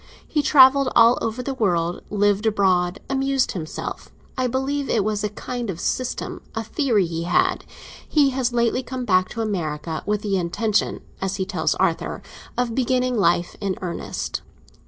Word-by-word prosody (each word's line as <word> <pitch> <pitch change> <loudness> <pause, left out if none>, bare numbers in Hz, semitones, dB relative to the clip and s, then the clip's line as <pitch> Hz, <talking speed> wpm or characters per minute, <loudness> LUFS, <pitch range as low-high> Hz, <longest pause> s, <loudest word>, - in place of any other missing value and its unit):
He 300 - +1
travelled 275 -2 +6
all 230 +1 +6
over 225 +3 -2
the 275 - -3
world, 175 -8 0
lived 205 +1 +2
abroad, 185 -3 +2
amused 270 -1 +1
himself. 160 -4 -6 0.3
I 255 -1 0
believe 270 +3 -1
it 215 - +2
was 210 0 -1
a 210 - 0
kind 240 +2 -5
of 170 -3 -4
system, 255 +6 -2
a 225 - -2
theory 225 - +1
he 165 0 -4
had. 175 - +1 0.4
He 285 -3 +4
has 255 -1 0
lately 235 +1 +1
come 255 -1 -5
back 185 -3 +3
to 230 - -4
America, 160 -7 -3
with 210 0 0
the 200 -2 0
intention, 205 +5 0 0.2
as 190 0 -1
he 190 -1 -2
tells - - 0
Arthur, - - -1 0.3
of 245 -2 0
beginning 255 0 +1
life 175 -4 +2
in 195 -2 -1
earnest." 175 -2 -4
220 Hz, 165 wpm, -23 LUFS, 185-255 Hz, 0.4 s, travelled